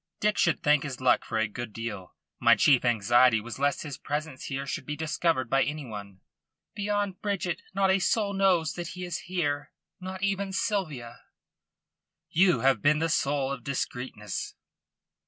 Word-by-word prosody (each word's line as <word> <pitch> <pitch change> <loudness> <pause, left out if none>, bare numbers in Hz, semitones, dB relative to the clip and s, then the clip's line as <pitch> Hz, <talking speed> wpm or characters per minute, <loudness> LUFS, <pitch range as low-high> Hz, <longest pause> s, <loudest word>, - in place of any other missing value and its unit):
Dick 210 0 +2
should 170 -4 +2
thank 150 -1 +4
his 135 -4 -5
luck 130 -1 +3
for 115 - -3
a 110 0 +2
good 115 +1 -6
deal. 105 -5 -6 0.2
My - - +6
chief 135 -4 +4
anxiety 120 +1 +4
was 115 +3 -8
lest 145 0 +1
his 145 -3 -7
presence 150 -2 -4
here 135 0 -3
should 140 0 -5
be 150 - -3
discovered 155 -3 0
by 135 +3 +2
any 150 -1 -2
one." 100 -4 -9 0.5
"Beyond 205 -2 -2
Bridget 185 -5 -2
not 195 -1 +3
a 190 - +3
soul 205 0 +1
knows 185 -5 +2
that 175 -1 -5
he 180 - -4
is 175 0 -3
here 145 -5 -1 0.3
not 185 +1 -6
even 195 -1 -1
Sylvia." 145 - -2 1.1
"You 180 +1 +4
have 135 0 +3
been 150 +1 +4
the 165 +2 0
soul 140 -4 +1
of 130 -3 -5
discreetness." 125 -6 -4
145 Hz, 170 wpm, -28 LUFS, 125-185 Hz, 1.1 s, My